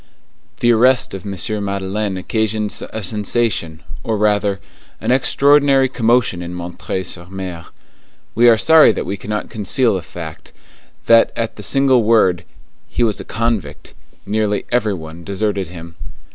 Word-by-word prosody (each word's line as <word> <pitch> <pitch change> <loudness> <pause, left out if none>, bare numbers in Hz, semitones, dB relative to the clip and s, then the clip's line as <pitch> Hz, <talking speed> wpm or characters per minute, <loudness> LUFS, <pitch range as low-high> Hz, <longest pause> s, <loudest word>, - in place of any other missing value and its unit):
The 120 -1 +4
arrest 125 +2 +3
of 95 +1 -7
M. 100 +2 -1
Madeleine 100 0 -3
occasioned 110 +2 -1 0.2
a 110 - -5
sensation, 100 -5 -1 0.2
or 110 - -1
rather, 105 -1 +1 0.4
an - - -1
extraordinary 140 +1 +4
commotion 120 -7 +1
in 90 +1 -6
M. 85 0 -7 0.3
sur 85 -1 -7
M. 95 -3 -6 0.7
We 120 +1 +5
are 115 - +5
sorry 160 +5 +6
that - - -4
we 100 - -3
cannot 105 +2 -5
conceal 110 +3 +1
the 95 - -2
fact, 80 -2 -10 0.5
that 115 0 +5
at 115 -1 -3
the - - -9
single 130 +3 +3
word, 110 -6 +2 0.4
"He 120 - -1
was 110 -3 0
a - - -5
convict," 115 -10 -3 0.3
nearly 105 0 -1
every 110 -4 +1
one 80 0 -10
deserted 100 0 -2
him. 85 -1 -10
105 Hz, 145 wpm, -18 LUFS, 95-115 Hz, 0.7 s, sorry